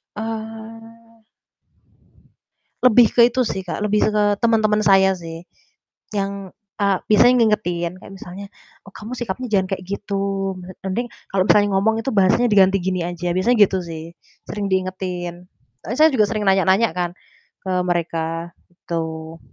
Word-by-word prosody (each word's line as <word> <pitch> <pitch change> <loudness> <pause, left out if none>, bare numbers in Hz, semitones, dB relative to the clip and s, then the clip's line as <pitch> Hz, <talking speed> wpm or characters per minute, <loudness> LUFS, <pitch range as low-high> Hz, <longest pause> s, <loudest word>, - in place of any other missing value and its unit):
Ah. 225 +1 -8 1.6
Lebih 245 -1 +6
ke 240 - +4
itu 250 +1 -1
sih, 205 -5 -3
Kak, 190 - -3
lebih 210 0 +2
ze - - +2
ke 210 - +3 0.2
teman-teman 220 -2 +2
saya 195 -2 +4
sih. 165 -2 -7 0.7
Yang, 195 -1 -4 0.2
eee, 200 -2 +2
biasanya 245 +4 +6
ngingetin, 175 -6 0
kayak 195 - -12
misalnya, 190 +1 -9 0.4
"Oh, 195 - -14
kamu 215 +3 -9
sikapnya 240 +2 -4
jangan 190 -3 +2
kayak 185 - -12
gitu, 195 -1 -3
mlet 180 0 -11
mending 230 +6 -2 0.2
kalau 190 -1 +2
misalnya 205 0 +4
ngomong 220 +3 +2
itu 270 - -2
bahasanya 200 +5 +3
diganti 195 -1 +5
gini 185 -1 -1
aja." 175 0 -3
Biasanya 230 +7 +2
gitu 190 - -2
sih, 165 0 -8 0.3
sering 205 -1 -3
diingetin. 180 -2 -3 0.4
E 225 - -4
saya 310 - +7
juga 215 -5 +4
sering 215 -2 -2
nanya-nanya 195 +3 +3
kan 175 -1 -1 0.5
ke 190 - -3
mereka, 165 -1 -2 0.2
gitu. 160 -2 -6
195 Hz, 145 wpm, -21 LUFS, 180-220 Hz, 1.6 s, saya